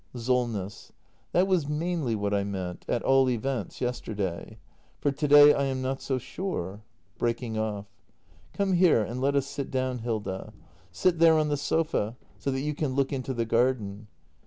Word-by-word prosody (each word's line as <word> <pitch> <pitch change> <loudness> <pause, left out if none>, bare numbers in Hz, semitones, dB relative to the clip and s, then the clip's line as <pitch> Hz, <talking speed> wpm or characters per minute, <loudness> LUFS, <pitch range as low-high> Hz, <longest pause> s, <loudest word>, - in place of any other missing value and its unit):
Solness. 115 -5 -2 0.4
That 180 +2 +4
was 180 -7 +1
mainly 155 -5 -1
what 105 -1 -1
I 100 -1 +2
meant 95 -3 -5
— - - -15
at 120 - 0
all 135 -1 +4
events, 125 -1 -3
yes 125 0 -1
terday. 100 0 -4 0.4
For 145 - +1
to 145 +2 -2
day 145 0 +9
I 140 - +1
am 130 -1 -2
not 135 +1 -2
so 130 - -1
sure 125 - -4 0.2
— - - -39
[Breaking 120 -1 -1
off.] 105 -2 -2 0.7
Come 200 -1 0
here 175 -10 +5
and 120 +4 -5
let 140 +1 +2
us 140 -1 +2
sit 140 0 -5
down, 130 -1 -1
Hilda. 105 -5 -4 0.4
Sit 180 -3 +1
there 165 -1 +6
on 155 -1 +1
the 145 - +1
sofa 145 -6 -1
— - - -31
so - - -2
that 135 0 -1
you 150 +1 -1
can 145 -3 -2
look 140 +1 +1
into 135 -1 -3
the 115 -1 0
garden. 115 -3 0
130 Hz, 190 wpm, -27 LUFS, 110-145 Hz, 0.7 s, day